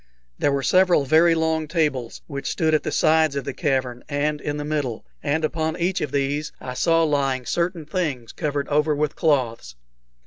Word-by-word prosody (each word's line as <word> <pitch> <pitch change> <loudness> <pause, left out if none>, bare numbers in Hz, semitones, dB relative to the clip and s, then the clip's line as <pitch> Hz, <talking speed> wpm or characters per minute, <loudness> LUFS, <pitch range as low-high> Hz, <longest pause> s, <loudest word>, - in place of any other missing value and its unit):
There 145 - +2
were 140 -1 -1
several 180 0 +4
very 165 +4 +5
long 160 -1 0
tables, 150 -8 -1
which 140 -3 -5
stood 160 -3 +1
at 155 - +3
the 155 - -3
sides 155 -2 +3
of 140 - -2
the - - -4
cavern 130 -5 -1
and 145 +1 -1
in 145 0 -3
the 145 - -4
middle, 145 - -2 0.2
and 155 +2 0
upon 160 0 -2
each 180 +2 0
of 145 - -2
these 145 +2 -1
I 125 - -6
saw 165 +5 +2
lying 135 -4 0
certain 170 +3 -1
things 145 -8 -3
covered 145 -3 -2
over 150 +1 +2
with 150 0 -1
cloths. 120 - 0
150 Hz, 185 wpm, -23 LUFS, 140-160 Hz, 0.2 s, very